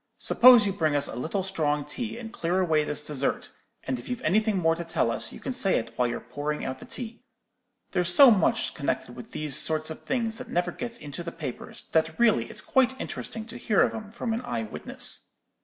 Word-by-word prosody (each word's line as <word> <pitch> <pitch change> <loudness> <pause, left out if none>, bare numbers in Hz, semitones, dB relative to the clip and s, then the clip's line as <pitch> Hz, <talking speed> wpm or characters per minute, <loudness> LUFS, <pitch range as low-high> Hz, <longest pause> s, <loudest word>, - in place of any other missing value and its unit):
'Suppose 245 -3 +7
you 200 - 0
bring 155 -5 +1
us 145 - +2
a - - -7
little 165 - -2
strong 150 -6 -1
tea, 220 +10 -4
and 230 -1 -8
clear 175 -1 0
away 160 -4 +2
this 150 0 -2
dessert; 145 -2 -2 0.3
and 130 -1 -2
if - - -10
you've 245 - -4
anything 210 +4 +2
more 165 -2 +3
to 170 - -5
tell 165 -8 0
us, 115 0 -3
you - - -10
can 260 - -4
say 195 -5 +2
it - - -4
while 125 - +2
you're 120 - -3
pouring 145 +5 -4
out 130 0 -4
the - - -10
tea. 240 -2 -6 0.7
There's 180 0 +2
so 270 +6 +9
much 195 -6 +2
connected - - -3
with - - -10
these 150 -3 -1
sort 155 +1 0
of 160 - -8
things 230 -3 -2
that 255 - -8
never 175 0 0
gets 235 +4 -5
into 145 +3 -7
the 170 0 -5
papers, 145 -8 -7
that 160 +6 +1
really 215 - +3
it's - - -4
quite 260 0 +2
interesting 225 -1 -5
to 230 - -8
hear 210 -4 +3
of - - 0
'em 215 -2 -7
from 225 +1 -3
an 230 - -2
eye 120 - -3
witness.' 110 - -1
175 Hz, 225 wpm, -27 LUFS, 150-225 Hz, 0.7 s, so